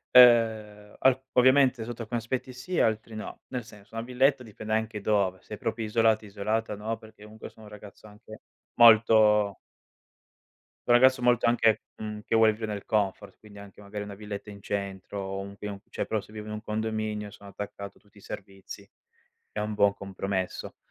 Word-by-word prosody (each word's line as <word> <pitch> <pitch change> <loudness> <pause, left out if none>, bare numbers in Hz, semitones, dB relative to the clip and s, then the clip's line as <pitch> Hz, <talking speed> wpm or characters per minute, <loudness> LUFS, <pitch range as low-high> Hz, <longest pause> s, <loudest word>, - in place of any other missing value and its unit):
Ehm, 110 -4 +5
al 130 0 +3
ovviamente 130 -2 +4
sotto 120 0 -6
alcuni 120 +2 -3
aspetti 125 +3 -4
sì, 130 +8 -3
altri 110 0 0
no. 110 - -8
Nel 125 -2 -4
senso 105 0 -16
una 115 - -3
villetta 130 +2 +2
dipende 110 -1 -7
anche 110 -1 -1
dove: 100 -3 +1
se - - -8
è - - -9
proprio 115 0 -3
isolati 110 0 +2
isolata 105 +2 -2
no, 110 +2 -3
perché 110 -1 -16
comunque 110 +1 -10
sono 110 - -16
un 105 - -13
ragazzo 105 +1 -13
anche 110 +1 -13 0.4
molto 110 -3 +6 1.3
un 120 - +6
ragazzo 130 +1 +6
molto 120 -1 +3
anche, 115 -2 +3
mhmm, 105 -1 -6
che - - -2
vuol 110 -1 +6
vivere 110 -1 -4
nel 100 - -6
comfort, 100 -1 -1
quindi 105 -1 -15
anche 100 0 -13
magari 105 +1 -6
una 100 -1 -8
villetta 105 0 -7
in 100 -1 -12
centro 100 -1 -4
o 95 0 -4
un 100 0 -8
pi 105 0 -6 0.2
cioè, - - -3
però 110 - -1
se 105 - -17
vivo 105 -1 -8
in 105 - -6
un 105 0 -6
condominio 110 -1 -3
sono 100 0 -13
attaccato 100 0 -8
a - - -32
tutti 105 -1 -29
i 100 - -14
servizi, 100 0 -9 0.6
è 105 - -3
un 105 0 -2
buon 100 -1 +4
compromesso. 95 -1 -4
110 Hz, 190 wpm, -27 LUFS, 100-115 Hz, 1.3 s, molto